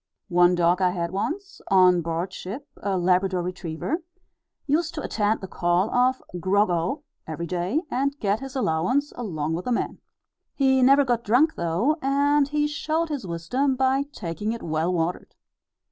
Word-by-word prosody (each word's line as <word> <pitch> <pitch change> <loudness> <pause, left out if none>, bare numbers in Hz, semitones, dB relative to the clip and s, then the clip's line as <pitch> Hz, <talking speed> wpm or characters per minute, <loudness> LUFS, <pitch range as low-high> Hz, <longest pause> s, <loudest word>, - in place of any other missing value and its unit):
One 175 0 +4
dog 175 +1 +2
I 185 - +4
had 170 -2 -3
once, 350 - -4
on 185 -2 +5
board 170 +3 -3
ship 215 +11 -7
a 195 -2 -1
Labrador 180 0 +2
retriever 180 - -4 0.6
used 310 +3 0
to 305 - -4
attend 215 0 0
the 190 - -6
call 175 +3 +1
of 255 +1 +2 0.2
"Grog 190 +2 +2
O!" 175 - -1 0.2
every 160 +2 -4
day, 180 - -1
and 280 +2 -1
get 205 +1 0
his 270 0 -8
allowance 255 - 0
along 160 -10 -3
with 175 +2 -3
the 250 - -1
men. 235 - -1 0.6
He 265 -1 +3
never 275 +2 +6
got 240 -2 0
drunk 255 +9 +3
though, 190 - 0
and 280 +1 +2
he 295 +1 0
showed 310 +2 -1
his 280 -10 -4
wisdom 245 +12 0
by 265 +1 +2
taking 200 - -4
it 235 - -7
well 160 +2 0
watered. 175 0 -2
205 Hz, 165 wpm, -25 LUFS, 175-275 Hz, 0.6 s, never